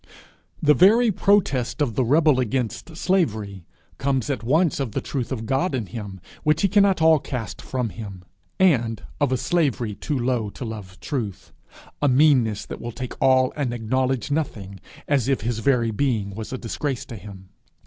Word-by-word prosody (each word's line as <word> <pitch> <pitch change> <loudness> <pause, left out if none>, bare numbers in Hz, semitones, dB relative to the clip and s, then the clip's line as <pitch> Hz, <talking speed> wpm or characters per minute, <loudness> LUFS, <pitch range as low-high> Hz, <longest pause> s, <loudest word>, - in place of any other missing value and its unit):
The 150 0 +6
very 215 - +5
protest 180 - +1
of 140 -6 +1
the 130 - +1
rebel 150 +2 +4
against 130 +6 -2
slavery, 110 - -1 0.3
comes 135 0 0
at 130 -6 -3
once 155 +8 +2
of 130 -7 -3
the - - 0
truth 130 -3 -4
of 115 -4 -3
God 135 +6 0
in 120 -4 -2
him, 100 -3 -7 0.2
which 155 +3 +1
he - - +5
cannot 195 -3 +3
all 160 -1 +6
cast 125 -6 -5
from 125 -3 -2
him, 100 -4 -9 0.4
and 120 - +2 0.2
of 145 -3 +1
a 130 - +2
slavery 130 -8 0
too 140 +8 -3
low 120 -3 0
to 120 - -7
love 105 -4 -8
truth 110 -9 -4 0.5
a 145 - +3
meanness 125 -6 +3
that - - -8
will 120 - -5
take 125 +1 -6
all 130 -1 +4
and 130 -5 -2
acknowledge 130 +2 -1
nothing, 105 -11 -3 0.3
as 140 -4 +1
if 135 -4 +1
his 115 +1 -2
very 120 -2 +2
being 110 -4 -1
was 110 +1 -7
a 130 - -3
disgrace 130 +2 -3
to 120 - -8
him. 100 -3 -11
130 Hz, 180 wpm, -23 LUFS, 110-145 Hz, 0.5 s, The